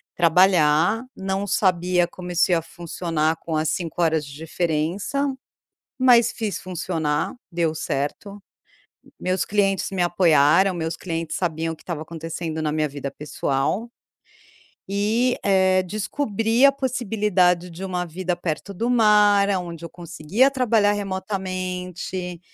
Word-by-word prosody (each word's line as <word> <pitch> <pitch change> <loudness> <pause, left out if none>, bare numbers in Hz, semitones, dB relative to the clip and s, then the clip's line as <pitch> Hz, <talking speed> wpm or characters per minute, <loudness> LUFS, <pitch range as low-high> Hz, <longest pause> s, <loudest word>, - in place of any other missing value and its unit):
trabalhar, 175 +4 +4
não 195 +1 -2
sabia 180 -2 +2
como 180 0 -8
isso 175 +1 +2
ia 165 -2 +2
funcionar 165 -2 -2
com 160 -1 -5
as 155 0 +1
5 175 -1 -3
horas 160 -2 +2
de 140 - -11
diferença, 170 - -1 0.7
mas 240 -3 +5
fiz 210 -6 -3
funcionar, 165 -4 -2 0.2
deu 165 -3 0
certo, 160 +8 -4 0.8
meus 185 0 -1
clientes 195 -2 +1
me 185 -2 -1
apoiaram, 175 +1 +4
meus 165 -1 -3
clientes 165 -2 -4
sabiam 165 -2 -2
o - - -9
que - - -20
estava 165 -4 -5
acontecendo 165 0 -5
na 155 -1 0
minha 155 -1 0
vida 140 -1 -6
pessoal 145 - -2 1.0
e, 220 +5 +1
eh, 190 -1 +3
descobri 220 +4 0
a 280 - +8
possibilidade 210 -9 +1
de 180 +3 -8
uma 180 -2 -2
vida 180 +2 -3
perto 175 +3 -4
do 230 +6 -2
mar, 210 -4 +4
aonde 170 -3 -3
eu - - -7
conseguia 175 - 0
trabalhar 225 -6 +2
remotamente, 185 -2 -4
180 Hz, 130 wpm, -23 LUFS, 165-200 Hz, 1.0 s, a